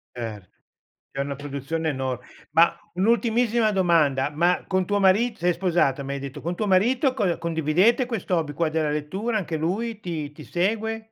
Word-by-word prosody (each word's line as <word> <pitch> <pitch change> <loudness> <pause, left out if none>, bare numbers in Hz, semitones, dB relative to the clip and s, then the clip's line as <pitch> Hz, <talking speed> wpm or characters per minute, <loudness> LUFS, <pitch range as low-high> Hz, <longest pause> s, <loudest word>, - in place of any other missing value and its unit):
Cer 110 -6 -6 0.6
c'è 135 - -3
una 140 0 -4
produzione 145 +3 -3
enor 130 -3 -2 0.3
ma 165 +2 +5 0.2
un'ultimissima 230 +2 +2
domanda, 160 -8 +2
ma 175 +4 +1
con 185 -1 +1
tuo 205 0 0
marit 210 +5 +3
sei 175 0 +1
sposata, 170 -7 +1
mi 140 +1 -4
hai 140 - -4
detto, 140 -1 -7
con 175 +2 -3
tuo 210 +1 -2
marito 245 +8 +3
cond 195 -8 0
condividete 170 - +2
questo 220 -6 -2
hobby 150 -2 -2
qua 165 +1 0
della 155 -1 0
lettura, 190 +10 -2
anche 170 -5 -3
lui 210 +7 -2
ti 160 -6 -5
ti 150 0 -12
segue? 220 +5 -1
175 Hz, 175 wpm, -24 LUFS, 150-210 Hz, 0.6 s, ma